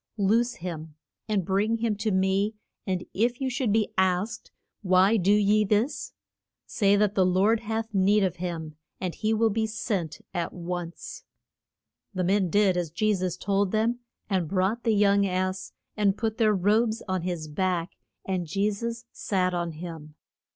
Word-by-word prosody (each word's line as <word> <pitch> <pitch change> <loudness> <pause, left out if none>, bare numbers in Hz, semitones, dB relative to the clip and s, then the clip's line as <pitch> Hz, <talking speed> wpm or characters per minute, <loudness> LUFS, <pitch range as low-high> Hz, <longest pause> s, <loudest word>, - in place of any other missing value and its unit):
Loose 230 +5 +2
him, 160 -3 -7 0.3
and 205 -5 0
bring 205 +5 +1
him 225 -2 0
to 210 +2 -1
me, 190 +2 +1 0.3
and 185 -1 -1
if 240 +4 +1
you 265 -1 -1
should 250 -3 0
be 215 0 +1
asked, 190 +4 0 0.3
Why 190 +2 +4
do 195 -2 +2
ye 210 +1 +4
this? 210 +7 0 0.5
Say 200 -2 +2
that 205 -1 +2
the 190 - +3
Lord 190 +5 +3
hath 225 0 -4
need 200 +2 +3
of 185 -2 -1
him, 165 -3 -5 0.2
and 180 -3 -3
he 215 - -1
will 225 0 +3
be 220 +1 0
sent 190 -7 -3
at 175 -2 -2
once. 175 -1 -6 0.9
The 185 - 0
men 190 0 +2
did 200 -1 +3
as 175 -2 -1
Je 215 +6 +1
sus 185 -2 -2
told 200 0 +1
them, 225 +3 +1 0.3
and 185 -5 0
brought 195 +5 0
the 225 -2 +3
young 200 -1 +4
ass 185 0 -2 0.2
and 205 -2 +2
put 225 -1 -2
their 215 -2 +4
robes 215 +4 +2
on 185 -1 -1
his 175 -3 -3
back, 180 +3 -1 0.3
and 185 -3 -2
Je 200 +6 +1
sus 235 +3 -5
sat 185 -2 0
on 170 -1 -2
him. 155 -2 -8
195 Hz, 170 wpm, -27 LUFS, 180-215 Hz, 0.9 s, Why